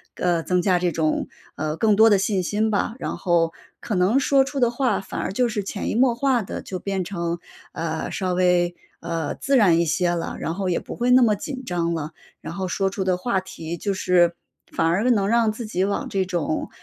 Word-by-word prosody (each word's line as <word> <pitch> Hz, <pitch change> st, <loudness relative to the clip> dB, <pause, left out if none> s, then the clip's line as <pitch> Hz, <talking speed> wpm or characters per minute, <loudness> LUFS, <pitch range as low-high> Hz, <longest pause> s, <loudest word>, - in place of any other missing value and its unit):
呃， 175 Hz, -2 st, 0 dB
增 180 Hz, +1 st, +1 dB
加 185 Hz, -1 st, +3 dB
这 175 Hz, 0 st, 0 dB
种 160 Hz, -1 st, 0 dB, 0.3 s
呃， 155 Hz, 0 st, -2 dB
更 215 Hz, +1 st, +3 dB
多 220 Hz, +1 st, +6 dB
的 200 Hz, -, +5 dB
信 195 Hz, -2 st, 0 dB
心 215 Hz, +4 st, 0 dB
吧。 210 Hz, +1 st, 0 dB
然 -, -, -4 dB
后 170 Hz, -3 st, +2 dB, 0.3 s
可 220 Hz, -4 st, -3 dB
能 190 Hz, +9 st, +3 dB
说 275 Hz, 0 st, +4 dB
出 270 Hz, +1 st, -4 dB
的 240 Hz, -2 st, +4 dB
话 240 Hz, -3 st, 0 dB
反 190 Hz, -, -6 dB
而 -, -, -3 dB
就 245 Hz, +1 st, +1 dB
是 210 Hz, -2 st, -2 dB
潜 195 Hz, +1 st, -4 dB
移 -, -, -2 dB
默 250 Hz, 0 st, +4 dB
化 245 Hz, -1 st, +1 dB
地 -, -, -6 dB
就 185 Hz, -, -6 dB
变 190 Hz, +1 st, -2 dB
成， 170 Hz, -2 st, -3 dB, 0.3 s
呃， 160 Hz, -1 st, -3 dB
稍 185 Hz, -1 st, -1 dB
微， 180 Hz, -1 st, +2 dB, 0.2 s
呃， 165 Hz, -3 st, -3 dB
自 275 Hz, 0 st, +1 dB
然 180 Hz, -7 st, +5 dB
一 170 Hz, -, +2 dB
些 175 Hz, +2 st, +1 dB
了， 170 Hz, -1 st, -3 dB
然 165 Hz, -, -2 dB
后 190 Hz, +1 st, -2 dB
也 170 Hz, -, +1 dB
不 -, -, -8 dB
会 245 Hz, +1 st, 0 dB
那 255 Hz, 0 st, +7 dB
么 215 Hz, -2 st, +4 dB
紧 260 Hz, +5 st, -6 dB
张 170 Hz, -4 st, -1 dB
了。 155 Hz, 0 st, -4 dB, 0.3 s
然 -, -, -7 dB
后 185 Hz, +1 st, -3 dB
说 195 Hz, +2 st, 0 dB
出 195 Hz, -, -2 dB
的 185 Hz, -1 st, +1 dB
话 195 Hz, +1 st, 0 dB
题 170 Hz, -3 st, -7 dB
就 200 Hz, +3 st, -2 dB
是 175 Hz, -2 st, +3 dB, 0.4 s
反 165 Hz, -, 0 dB
而 200 Hz, +9 st, +2 dB
能 205 Hz, -5 st, +3 dB
让 230 Hz, 0 st, +3 dB
自 225 Hz, +2 st, -6 dB
己 190 Hz, -3 st, -1 dB
往 200 Hz, +1 st, -1 dB
这 195 Hz, -1 st, 0 dB
种 170 Hz, -4 st, -2 dB
190 Hz, 245 characters per minute, -23 LUFS, 175-220 Hz, 0.4 s, 那